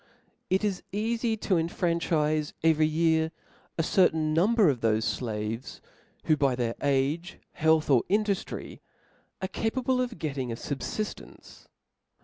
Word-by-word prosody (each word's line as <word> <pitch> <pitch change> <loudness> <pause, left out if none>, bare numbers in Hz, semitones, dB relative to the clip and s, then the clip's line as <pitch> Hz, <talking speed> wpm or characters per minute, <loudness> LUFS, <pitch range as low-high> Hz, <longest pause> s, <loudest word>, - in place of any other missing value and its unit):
It 190 +3 +2
is 200 -3 -1
eafy 225 +2 -1
to 185 - +2
enfranchife 160 -3 0
every 160 -1 +4
year 160 0 +2 0.5
a 165 - +1
certain 160 -3 +2
number 205 +5 +4
of 135 -5 +2
thofe 110 -1 +1
flaves, 110 0 -4 0.4
who 155 - +3
by 140 -3 +2
their 120 -2 -1
age, 145 +6 0
health 160 0 +2
or 130 -5 +5
induftry, 205 -1 -1 0.6
are - - 0
capable 250 +5 0
of 245 -2 -3
getting 135 -5 -3
a - - -3
fob 135 +3 -5
liftence. 215 +9 -6
160 Hz, 130 wpm, -28 LUFS, 140-195 Hz, 0.6 s, or